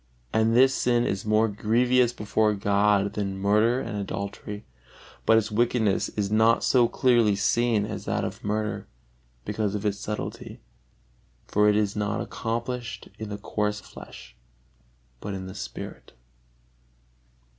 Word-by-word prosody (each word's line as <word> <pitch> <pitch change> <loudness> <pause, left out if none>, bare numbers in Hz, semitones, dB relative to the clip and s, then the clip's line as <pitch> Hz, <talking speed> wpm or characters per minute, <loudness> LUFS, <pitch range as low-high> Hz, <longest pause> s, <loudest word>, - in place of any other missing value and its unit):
And 110 +1 +3
this 130 +2 +6
sin 120 -2 +2
is 95 +2 -2
more 110 +1 +4
grievous 120 +4 +2
before 105 -1 0
God 100 0 +2
than 100 -2 -3
murder 105 +5 +3
and 105 - -5
adultery; 100 +1 -5 0.6
but 110 - +6
its 110 0 0
wickedness 110 -2 +1
is 100 -1 -3
not 110 +2 +4
so 125 -3 +4
clearly 120 -4 +3
seen 115 0 +2
as - - -6
that - - -1
of - - -5
murder, 105 +1 -2 0.6
because 105 -2 -1
of 105 +1 -4
its 100 -1 0
subtilty, 105 0 -5 0.9
for 105 0 +3
it 105 - +3
is 105 -1 +1
not 105 +1 -1
accomplished 115 -2 -4
in 110 -1 -5
the 105 - -4
coarse 105 0 -2
flesh, - - -12 0.8
but 100 +5 -5
in 95 -1 -6
the 95 - -8
spirit. 65 -11 -8
105 Hz, 140 wpm, -26 LUFS, 100-115 Hz, 0.9 s, this